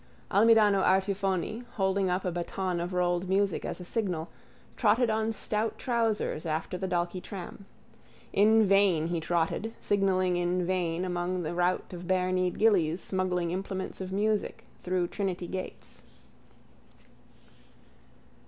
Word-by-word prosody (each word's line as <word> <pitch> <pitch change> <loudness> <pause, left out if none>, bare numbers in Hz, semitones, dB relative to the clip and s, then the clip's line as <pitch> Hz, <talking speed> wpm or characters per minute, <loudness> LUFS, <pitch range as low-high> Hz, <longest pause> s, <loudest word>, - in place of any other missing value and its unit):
_ - - -4
Almidano 210 -2 +5
Artifoni, 195 +2 +1
holding 190 -1 +1
up 180 +1 -1
a 180 - 0
baton 175 +1 -2
of 175 +2 -3
rolled 180 0 0
music 195 -1 +1
as - - -4
a 180 - -8
signal, 175 -6 -2 0.5
trotted 225 +1 +3
on 220 +1 0
stout 215 0 -2
trousers 225 - -1
after 160 +3 -2
the 190 +1 -3
Dalkey 175 0 -1
tram. 195 +1 -8 0.7
In 220 +2 +5
vain 190 -5 +3
he 170 -1 -1
trotted, 170 +7 -1
signalling 185 -3 +1
in 175 0 0
vain 180 -1 -1
among 180 0 -2
the 155 - -3
rout 180 +1 0
of 175 0 -7
barekneed 185 -1 +1
gillies 185 -7 +3
smuggling 180 -3 -1
implements 190 +1 -4
of 190 0 -5
music 210 +2 -1 0.2
through 180 -1 0
Trinity 185 -2 -3
gates. 185 +2 -7
185 Hz, 135 wpm, -29 LUFS, 175-200 Hz, 0.7 s, Almidano